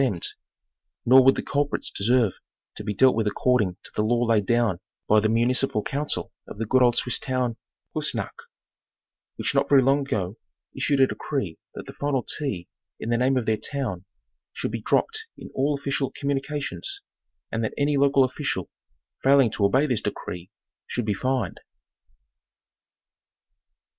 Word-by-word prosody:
demned; 100 -10 0 0.8
nor 130 +2 +8
would 135 +1 +6
the - - -3
culprits 145 +1 -1
deserve 115 0 +2 0.4
to - - -6
be 105 - -2
dealt 130 +6 +4
with 110 -1 0
accord 125 +4 +2
ing 90 -3 -2
to - - -11
the - - +1
law 120 +3 +2
laid 110 -4 +2
down 120 -7 +2 0.3
by 110 - +5
the 110 +1 +1
municipal 120 0 +1
council 145 +2 -2 0.2
of - - -9
the 115 - -2
good 130 +4 +3
old 120 -1 +4
Swiss 125 - +2
town 125 -3 -1 0.4
of - - 0
Kiissnacht, - - -4 0.9
which - - -1
not - - +2
very 135 -2 +6
long 135 +2 +4
ago 105 -8 -2 0.4
issued 140 -2 +1
a - - +8
decree 130 - -4 0.2
that - - -7
the - - -9
final 140 -3 -1 0.2
¢ 100 -12 -3 0.3
in 115 - -3
the 120 - +3
name 130 +1 +3
of 125 - -1
their 110 -1 +1
town 110 -8 -4 0.5
should - - -3
be - - -4
dropped 445 0 0
in - - -10
all 140 +2 +1
official 140 -1 -1
communications, 145 - -3 0.5
and 115 0 -1
that 110 - -2
any 145 0 +2
local 140 -1 +4
official 130 - -2 0.5
failing 135 -4 +5
to 105 - -2
obey 130 +9 +4
this 125 -7 0
decree 90 +1 -5 0.4
should 120 - -2
be 105 - +1
fined. 130 -2 -1
125 Hz, 170 wpm, -25 LUFS, 110-140 Hz, 0.9 s, nor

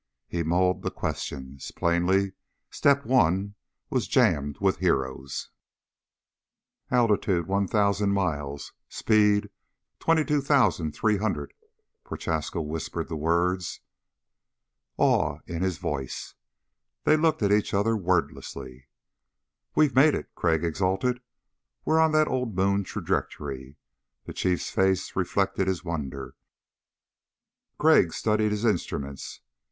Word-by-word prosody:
He 85 - -2
mulled 90 +3 +1
the - - -2
questions. 65 0 -5
Plainly, 95 +3 +1 0.4
Step 140 0 +2
One 100 -5 +2 0.4
was - - 0
jammed 70 0 +2
with 95 -1 +1
heroes. 65 -6 -1 1.4
"Altitude, 105 - +2
1,000 100 +1 +1
miles, 75 -8 -2 0.2
speed, 105 -1 +2 0.5
22,300." 110 - +1 0.5
Prochaska 80 +1 -3
whispered 80 +2 -4
the 80 - -3
words, 85 +3 0 1.2
awe 75 -1 +2
in 85 -1 -5
his 95 -3 0
voice. 70 -3 -4 0.7
They 155 - +5
looked 155 -5 +1
at 100 - +2
each 105 0 +2
other 105 +3 +2
wordlessly. 85 - -2 0.9
"We've 150 -4 +4
made 145 +3 +5
it," - - -6
Crag 80 -2 +1
exulted. 95 +9 0 0.6
"We're 160 +1 +3
on 160 -1 +4
that 155 0 +4
old 125 -5 -2
moon 100 +2 +2
trajectory." 70 -4 -4 0.5
The - - -7
Chiefs 90 -1 -1
face 95 -1 +1
reflected 95 +1 0
his 95 -2 -1
wonder. 70 -5 -5 1.4
Crag - - +4
studied 105 0 +1
his 105 +2 -2
instruments. 70 - -3
95 Hz, 105 wpm, -26 LUFS, 80-105 Hz, 1.4 s, They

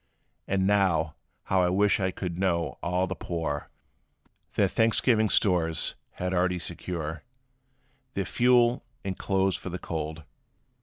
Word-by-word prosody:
And 95 -1 +1
now 95 -6 +2 0.3
how 95 -1 +2
I 90 - +3
wish 100 +3 +3
I 95 -1 +1
could 90 -2 -5
know 85 -4 0
all 90 +1 +1
the 95 - -3
poor 80 -5 -3 0.9
Their - - +4
Thanksgiving 110 -1 +3
stores 85 -5 +2 0.2
had 90 +1 -3
already 90 0 +2
secure, 85 -2 -4 0.9
Their - - -1
fuel, 120 0 +3 0.2
and 95 -1 -2
clothes 95 -1 +1
for - - -7
the 90 - -4
cold!" 80 -2 -5
90 Hz, 135 wpm, -27 LUFS, 85-95 Hz, 0.9 s, Their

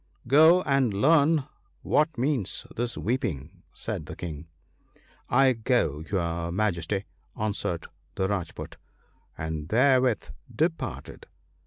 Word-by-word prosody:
'Go 160 +7 +6
and 135 -7 +2
learn 150 +5 +4 0.4
what 155 0 +2
means 125 -6 -1
this 120 0 -2
weeping,' 95 - -3
said - - -5
the - - -7
King. 80 -2 -7 0.4
' - - -32 0.2
I 130 - +5
go, 110 - 0
your 85 -3 -1
Majesty,' 95 0 -1 0.3
answered 100 -5 -2 0.3
the 95 - 0
Rajpoot, 95 -5 -4 0.6
and 80 0 -4
there 130 +4 +4
with 125 -4 0 0.2
departed. 160 +8 -3
110 Hz, 115 wpm, -27 LUFS, 85-135 Hz, 0.6 s, Go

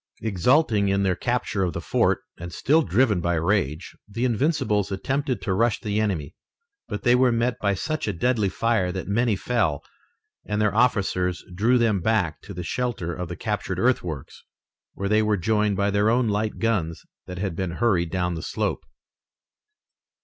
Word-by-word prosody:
Exulting 110 - +2
in 100 0 +1
their 95 -2 +2
capture 120 -3 -1
of 90 -3 0
the - - -3
fort - - +1
and 85 +1 -8
still 150 - +3
driven 110 - +2
by 85 0 0
rage, 85 -2 -1
the 115 +5 -2
Invincibles 110 - +1
attempted 130 +2 -2
to 95 - 0
rush 115 +2 +2
the 105 0 -1
enemy, 85 -9 -2 0.5
but 105 - -5
they 120 - +5
were 125 0 +4
met 120 +1 0
by 100 -1 +1
such 155 - -3
a - - +1
deadly 110 +1 +1
fire 110 -3 0
that 95 0 -5
many 110 +2 +2
fell, 95 - 0 0.6
and 105 0 -2
their 105 -2 +2
officers 95 -6 +1
drew 115 +7 +3
them 110 -5 +2
back 90 -6 0
to - - -11
the 90 - -5
shelter 110 -6 -2
of 90 +1 -5
the 90 - -5
captured 100 -2 -3
earthworks, 90 - -1 0.5
where 100 - -3
they 105 +2 +3
were 105 -1 +1
joined 105 +1 +1
by 100 +1 +1
their 100 +2 +2
own 120 +1 +2
light 105 +1 -1
guns 95 -8 -1 0.2
that 90 - -7
had 95 -2 -3
been 90 -1 -3
hurried 90 -5 +1
down 90 0 -1
the 80 - -5
slope. - - -2
105 Hz, 180 wpm, -24 LUFS, 90-115 Hz, 0.6 s, they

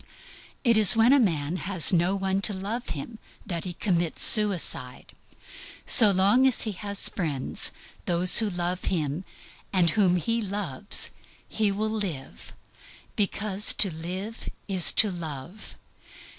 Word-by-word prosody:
It 235 -4 +3
is 215 -2 +6
when 225 +4 +4
a 285 - +4
man 165 - -1
has 185 -2 +2
no 175 +3 +1
one 195 0 -2
to 205 0 -3
love 215 +6 -5
him 215 +10 -7 0.3
that 170 -5 -4
he 180 - -5
commits 175 -5 -2
suicide. 190 - 0 0.7
So 220 -3 +6
long 200 +7 +3
as 260 - +1
he 220 - -2
has 200 +1 -1
friends, 150 -8 -2 0.4
those 180 +3 +4
who 220 -2 -1
love 180 0 -4
him 160 0 -3 0.5
and 175 -4 +2
whom 190 -3 +2
he 230 +6 -1
loves, 200 -5 -1 0.4
he 215 -2 0
will 210 +2 -3
live, 180 -11 -6 0.6
because 205 0 0
to 195 -5 +3
live 185 +7 -7 0.2
is 190 -4 +5
to 210 - +4
love. 165 +3 -9
190 Hz, 140 wpm, -25 LUFS, 170-210 Hz, 0.7 s, is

